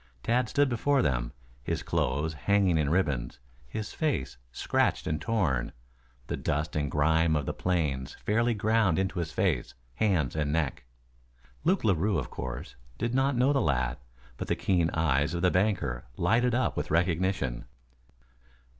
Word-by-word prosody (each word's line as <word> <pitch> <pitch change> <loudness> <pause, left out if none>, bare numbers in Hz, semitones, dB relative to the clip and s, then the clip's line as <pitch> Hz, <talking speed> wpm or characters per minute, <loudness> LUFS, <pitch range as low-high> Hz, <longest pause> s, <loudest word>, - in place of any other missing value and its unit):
Tad 120 0 +1
stood 145 0 +3
before 130 +2 +2
them, - - 0 0.3
his - - -3
clothes 80 +2 0
hanging 95 +1 +2
in 75 -2 +1
ribbons, 75 -9 0 0.3
his 105 - -5
face 140 - -1
scratched - - 0
and 75 -1 -2
torn, 85 - 0 0.5
the - - -3
dust 75 +2 -2
and 75 -2 0
grime 80 +2 +2
of 75 -2 -1
the - - -2
plains 75 -8 -1
fairly 115 +2 +2
ground 105 -4 +2
into 95 -1 -1
his 85 -2 -3
face, - - 0 0.2
hands 90 - +1
and 75 -2 0
neck. 75 -5 -1 0.8
Luke 185 +3 +2
Larue, 100 -1 +2
of 75 - -4
course, 65 -2 -6 0.2
did 115 +1 -2
not 135 0 +2
know 130 +4 +4
the 135 - +2
lad, 60 0 0 0.4
but - - -5
the - - +1
keen 85 -4 +1
eyes 75 0 +1
of 85 - -2
the 90 - +4
banker 95 - 0
lighted 120 +2 +2
up 130 - +1
with 75 - -3
recognition. 85 -6 0
85 Hz, 155 wpm, -28 LUFS, 75-110 Hz, 0.8 s, know